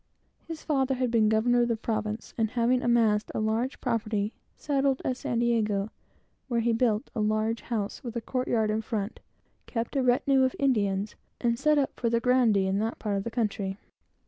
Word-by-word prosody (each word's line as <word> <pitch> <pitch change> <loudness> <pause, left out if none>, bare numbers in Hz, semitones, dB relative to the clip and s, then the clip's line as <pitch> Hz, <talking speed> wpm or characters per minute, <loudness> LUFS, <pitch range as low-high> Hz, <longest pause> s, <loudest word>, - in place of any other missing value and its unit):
His 325 -1 -7
father 270 -3 +1
had 250 -2 -1
been 220 -2 +4
governor 240 +3 +3
of 240 - +2
the 230 - +1
province, 215 -1 -3
and 225 -2 0
having 245 +1 +2
amassed 225 -4 +2
a - - 0
large 220 +4 -1
property, 215 -3 -1 0.2
settled 275 -2 +1
at 255 - 0
San 240 -2 -3
Diego, 220 -4 +1 0.6
where 235 -3 0
he 235 0 +2
built 225 -2 +1
a 230 - -3
large 215 +2 0
house 220 +1 -4
with 240 -2 -6
a 235 - -2
court 255 +2 -2
yard 220 -2 +1
in 215 +1 0
front, 220 -2 -4 0.5
kept 230 +3 -3
a 270 - +2
great 255 - 0
retinue 265 +2 +3
of 260 -1 +2
Indians, 210 -6 +1 0.3
and 235 -1 0
set 305 0 +3
up 275 -2 -1
for 235 - +1
the 235 0 +2
grandee 235 -6 +3
of 190 +1 0
that 225 +2 -2
part 210 -2 -2
of 195 - -1
the 235 - -3
country. 210 -4 -2
230 Hz, 200 wpm, -28 LUFS, 215-250 Hz, 0.6 s, been